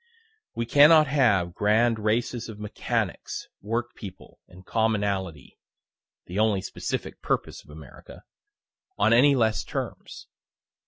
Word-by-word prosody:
We 115 - -2
cannot 150 +5 +6
have 110 -12 +2
grand 110 +3 +2
races 115 +2 -1
of 110 - -9
mechanics, 105 -1 -4
work 120 +3 -3
people, 95 -4 -12
and 90 +1 -16
commonalty, 100 - -2 0.7
(the 90 +4 -4
only 105 -3 +2
specific - - -5
purpose - - -3
of - - -24
America,) 75 -3 -13 0.7
on 105 +3 +3
any 140 +4 +5
less 110 -4 +1
terms. - - -6
110 Hz, 115 wpm, -25 LUFS, 100-120 Hz, 0.7 s, cannot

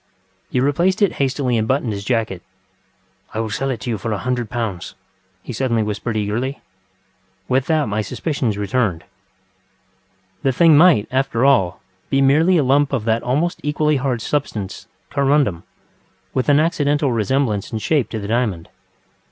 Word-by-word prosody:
ŌĆØ 95 0 -42
He 125 - +2
replaced 170 +9 +2
it 200 - +3
hastily 130 -3 0
and 110 - -1
buttoned 130 -4 0
his 100 0 -5
jacket. 110 -6 -1 0.9
ŌĆ£I - - -1
will 110 - -3
sell 135 +6 -2
it 115 -6 -4
you 115 -4 -2
for 115 - -4
one 105 -3 -2
hundred 125 -3 -2
pounds, 110 -8 -4
ŌĆØ 95 0 -41
he 125 - -6
suddenly 115 -2 0
whispered 105 +2 -3
eagerly. 115 +7 -2 0.9
With 130 +1 +1
that 155 -6 +1
my 105 +1 -1
suspicions 125 -2 -2
returned. 100 -4 -1 1.4
The 135 - +2
thing 165 +3 +5
might, 155 - +5
after 130 -2 +1
all, 95 -11 +3 0.3
be 135 - +2
merely 155 +7 +4
a 150 - +3
lump 140 +2 +2
of 120 -5 -1
that 115 0 +1
almost 150 +8 -1
equally 150 0 +1
hard 125 -3 -2
substance, 110 -9 -3 0.2
corundum, 140 - +2 0.7
with 130 +2 0
an 145 0 +5
accidental 145 -3 +1
resemblance 115 -2 0
in 110 - -2
shape 140 +4 0
to 110 - -4
the 100 - -6
diamond. 110 -7 -1
125 Hz, 165 wpm, -20 LUFS, 105-140 Hz, 1.4 s, thing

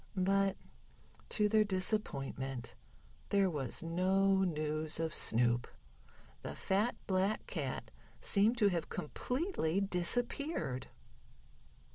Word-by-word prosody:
But 195 +1 +2 0.7
to 210 -1 +2
their 215 +1 +4
disappointment 135 - -2 0.6
there 195 -2 +3
was 140 -2 -3
no 190 +3 +2
news 155 -2 -1
of 160 -1 -1
Snoop. 120 +1 +2 0.7
The - - -6
fat, 205 +5 +1
black 190 +2 0
cat 130 - -4 0.3
seemed 215 +5 +3
to 210 -3 +4
have 175 -3 -2
completely 195 - -1
disappeared. 195 - 0
185 Hz, 95 wpm, -34 LUFS, 150-200 Hz, 0.7 s, their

